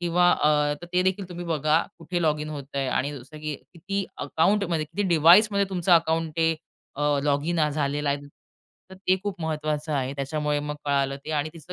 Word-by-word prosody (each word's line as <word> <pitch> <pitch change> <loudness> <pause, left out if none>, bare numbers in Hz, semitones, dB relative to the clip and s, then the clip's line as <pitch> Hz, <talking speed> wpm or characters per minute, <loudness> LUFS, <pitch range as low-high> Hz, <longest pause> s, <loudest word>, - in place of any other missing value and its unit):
किंवा 175 +1 +3
अ, 150 -1 +2
तर - - -7
ते 180 0 +3
देखील 190 0 -1
तुम्ही 175 -1 -7
बघा 155 0 +2 0.2
कुठे 175 +1 -3
लॉगिन 150 -1 0
होत 145 -2 -6
आहे 135 -1 0
आणि 140 +3 -1
जसं 130 +5 -12
की 155 -1 -3 0.2
किती 195 +4 -3
अकाउंटमध्ये 165 +2 +1
किती 195 +7 -3
डिव्हाइसमध्ये 190 +5 +6
तुमचं 180 -1 +1
अकाउंट 165 -1 +3
ते 165 0 +2 0.4
अ, 145 - -3 0.2
लॉगिन 150 +4 +1
झालेलं 145 0 -1
आहे. 140 0 +1 0.7
तर - - -9
ते 185 0 +1
खूप 205 -4 -4
महत्त्वाचं 155 -1 -2
आहे. 135 -2 -1
त्याच्यामुळे 150 +1 -1
मग 150 0 -4
कळालं 140 -1 +1
ते 155 - -6
आणि 145 +2 -1
तिचं 165 +2 -10
155 Hz, 185 wpm, -25 LUFS, 145-175 Hz, 0.7 s, डिव्हाइसमध्ये